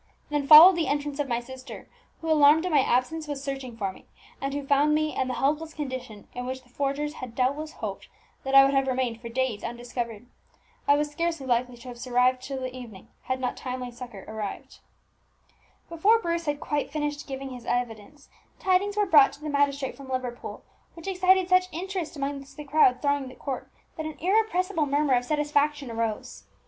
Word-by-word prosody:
Then 290 -2 -1
followed 335 +5 +10
the 330 - 0
entrance 290 0 -2
of 290 - 0
my 235 -2 0
sister, 260 +1 -10 0.3
who, 325 -1 -1
alarmed 305 +2 +6
at 365 - -1
my 295 - +5
absence, 270 +5 0
was 285 -2 -5
searching 270 -4 -5
for 195 -4 -2
me, - - -17 0.4
and 275 0 -2
who 285 0 -4
found 285 +2 +3
me 310 0 0
in 260 - 0
the 255 - -2
helpless 305 +3 -1
condition 260 -8 -6
in 250 0 -5
which 260 0 -5
the 245 - -25
forgers 285 +3 -2
had 245 -3 -7
doubtless 285 +5 -1
hoped - - -6 0.4
that 270 0 -1
I 275 0 +10
would 275 - +1
have 270 -1 +2
remained 250 -3 -1
for 235 - -7
days 245 -3 -1
undiscovered. 235 -1 -5 0.6
I 285 - +6
was 295 0 -1
scarcely 330 -2 -2
likely 245 0 0
to 240 - -13
have 240 -1 -9
survived 250 +1 +2
till 265 0 -5
the 255 0 -5
evening, 225 -5 -11 0.2
had 260 0 -1
not 255 - -2
timely 250 -1 -5
succour 235 -5 -10
arrived." 215 -2 -6 1.1
Before 390 +7 +3
Bruce 340 -6 -2
had 290 -1 -1
quite 295 -1 -2
finished 295 -1 -3
giving 270 -1 -6
his 245 -2 -9
evidence, 245 +3 -3 0.3
tidings 390 +2 +1
were 415 - +3
brought 300 -7 +6
to - - -14
the 305 - -4
magistrate 280 -1 0
from 275 -1 -12
Liverpool, 255 -2 -5 0.3
which 335 +2 -10
excited 375 -1 +3
such 365 0 +4
interest 360 0 -4
amongst 275 0 -5
the 300 - -6
crowd 280 -3 +3
thronging 285 -2 0
the 255 - -12
court 270 -3 -5 0.3
that 315 -1 -3
an 310 - -8
irrepressible 370 -4 +1
murmur 285 0 +2
of 245 0 +2
satisfaction 295 -2 0
arose. 225 -2 -4
275 Hz, 195 wpm, -26 LUFS, 250-305 Hz, 1.1 s, followed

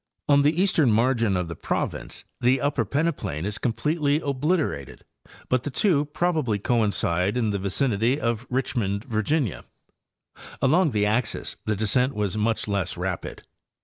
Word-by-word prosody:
On 140 -1 +5
the 150 +4 +2
eastern 165 - +3
margin 115 -3 +2
of 90 -1 -2
the 85 - -6
province - - -3 0.2
the 125 +2 +3
upper 140 -3 0
peneplain 140 - -1
is 105 +1 -4
completely 145 +6 0
oblit 145 +4 0
erated, 70 - -4 0.5
but 130 -1 +1
the 145 - -4
two 150 0 +2
probably 150 -7 0
coincide 100 -3 +1
in 110 -4 +1
the 100 - -1
vicinity 115 +5 +1
of 115 -2 -2
Rich 130 +1 -1
mond, 100 -3 -1
Virginia. 120 - -1 1.0
Along 160 +5 +3
the 105 -5 +1
axes 110 +3 -1
the 110 - 0
descent 125 +6 +1
was 105 -2 -1
much 110 +1 0
less 95 -4 -2
rapid. 90 0 -4
120 Hz, 150 wpm, -25 LUFS, 105-145 Hz, 1.0 s, On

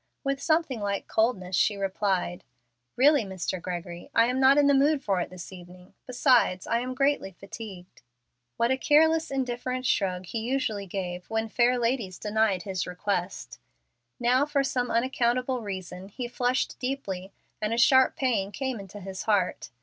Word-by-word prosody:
With 275 -1 -1
something 315 -5 +1
like 200 -1 -2
coldness 195 -5 0
she 205 +3 +2
replied, 190 -2 -1 0.5
"Really, 285 +1 +5
Mr. 185 -2 -4
Gregory, 175 -1 -6
I 230 - +6
am 250 +2 0
not 265 +2 +6
in 290 - +5
the 280 - +5
mood 280 +1 +3
for 190 -3 +1
it - - -4
this 185 +1 -9
evening; 180 0 -13
besides, 250 -7 +3
I 230 - +1
am 255 +1 -4
greatly 275 -7 +1
fatigued." 195 -1 -10 0.6
What 235 +2 +2
a 265 - +2
careless, 320 +3 +4
indifferent 255 -1 -2
shrug 185 -5 0
he 225 +6 -4
usually 220 -4 -2
gave 180 -1 -5
when 225 0 -1
fair 245 +3 +3
ladies 230 -6 -1
denied 210 -3 0
his 190 -4 -3
requests! 180 0 -3 0.6
Now, 250 +3 +3
for 285 -2 +1
some 250 -2 -1
unaccountable 250 +1 0
reason, 190 -2 -6
he 245 +4 -5
flushed 245 +1 -1
deeply 200 -8 -4 0.3
and 210 0 -1
a 230 - 0
sharp 260 +2 +5
pain 220 -7 0
came 260 -1 -3
into 200 +1 -10
his 190 0 -6
heart. 200 -4 +1
225 Hz, 165 wpm, -27 LUFS, 190-260 Hz, 0.6 s, I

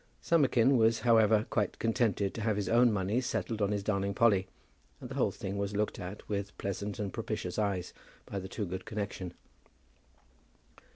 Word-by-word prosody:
Summerkin 135 -5 +3
was, 115 0 +3
however, 110 -2 +4
quite 105 -4 0
contented 110 -4 +1
to 115 - -5
have 110 -1 +1
his 100 -2 -2
own 120 +1 +5
money 105 +4 0
settled 115 -3 -2
on 100 - +2
his 100 -1 -1
darling 100 -1 -1
Polly, 100 -5 +4 0.5
and - - -9
the - - -3
whole - - +2
thing 100 +1 -5
was 100 0 -2
looked 105 +1 -1
at 90 +3 -7
with 100 -1 -3
pleasant 100 +1 -3
and 100 -3 -3
propitious 90 +3 -3
eyes 95 -4 -1 0.3
by 100 - -4
the 95 0 -7
Toogood 95 -4 -4
connection. 100 -4 -4
105 Hz, 170 wpm, -31 LUFS, 100-115 Hz, 0.5 s, own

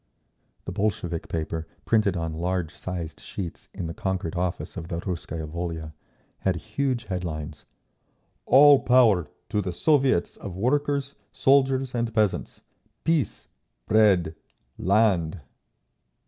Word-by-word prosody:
_ - - -43
The - - -4
Bolshevik 90 -4 -2
paper, 80 0 -3 0.2
printed 105 -5 +2
on 80 -1 -2
large 90 0 -2
sized 85 -4 -6
sheets 90 -4 -7
in 90 - -5
the 80 - -4
conquered 95 -3 -3
office 90 +1 -2
of 85 -3 -6
the 85 -2 -3
Russkaya 85 -3 -4
Volia, 80 -1 -5 0.5
had 95 -2 +1
huge 120 +7 -2
headlines: 80 -5 -5 0.8
"ALL 145 +1 +8
POWER—TO 105 -6 +2
THE 90 -2 -3
SOVIETS 130 - +2
OF 95 -3 -7
WORKERS, 140 +4 0 0.2
SOLDIERS 135 0 +3
AND 115 -2 -2
PEASANTS! 105 -3 0 0.4
PEACE! 165 -5 0 0.4
BREAD! 100 -7 +4 0.5
LAND!" 95 -5 +2
95 Hz, 120 wpm, -26 LUFS, 85-120 Hz, 0.8 s, ALL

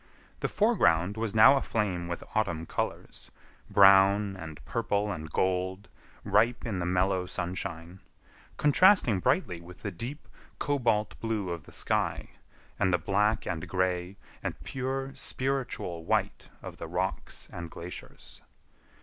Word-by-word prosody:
The - - 0
foreground 105 - +3
was 110 -1 -2
now 110 +6 +8
aflame 100 -9 -1
with 85 0 -4
autumn 85 -7 0
colors, - - -4 0.4
brown 100 0 +6
and 80 -5 -8
purple 105 - -1
and 80 -4 -6
gold, 95 +2 -1 0.3
ripe 120 +1 +2
in 105 -6 -2
the 85 - -2
mellow 90 0 +1
sunshine; 85 0 -5 0.6
contrasting 150 - +5
brightly 125 - 0
with 90 +2 -13
the 100 - -3
deep, 120 - -7 0.3
cobalt 115 -7 0
blue 110 -5 -2
of 85 -3 -5
the - - -14
sky, - - -1 0.5
and 95 - +2
the 90 - +4
black 105 +5 +1
and 80 -3 -3
gray, 90 0 -1 0.2
and - - -4
pure, 135 +1 -3
spiritual 130 -11 -3
white - - -1
of - - -8
the 85 - -6
rocks 90 +3 -3
and 85 -1 -6
glaciers. 85 +2 -10
95 Hz, 130 wpm, -29 LUFS, 90-115 Hz, 0.6 s, now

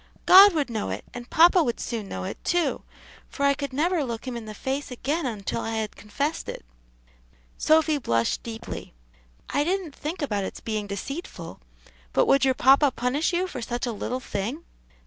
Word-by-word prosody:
"God 390 +1 +9
would 285 -5 0
know 220 -2 -2
it, - - -5
and 245 0 -8
papa 345 +2 +6
would 240 -7 -1
soon 220 -4 -4
know 95 - -5
it, - - -6
too, 345 -1 0 0.5
for 280 - -2
I 280 - +5
could 280 -1 -5
never 320 +4 +1
look 235 -3 -5
him 250 - -3
in 235 -2 -6
the 215 0 -8
face 270 +6 -3
again 275 +5 -2
until 210 -5 -3
I 225 0 -3
had 220 -1 -3
confessed 280 +9 -3
it." - - -7 0.9
Sophy 310 -1 +3
blushed 115 - 0
deeply. 225 - -7 0.6
"I 285 - +2
didn't 355 -2 -2
think 310 +3 -5
about 205 -8 -1
its - - -6
being 215 -2 -3
deceitful. 275 - -6 0.5
But - - +4
would 275 -9 +4
your 265 -1 +3
papa 275 +3 +5
punish 260 +7 0
you 355 +1 +1
for 360 -9 -6
such 240 +2 -3
a 240 - -2
little 245 +3 -3
thing?" 245 +7 -4
265 Hz, 185 wpm, -25 LUFS, 225-310 Hz, 0.9 s, God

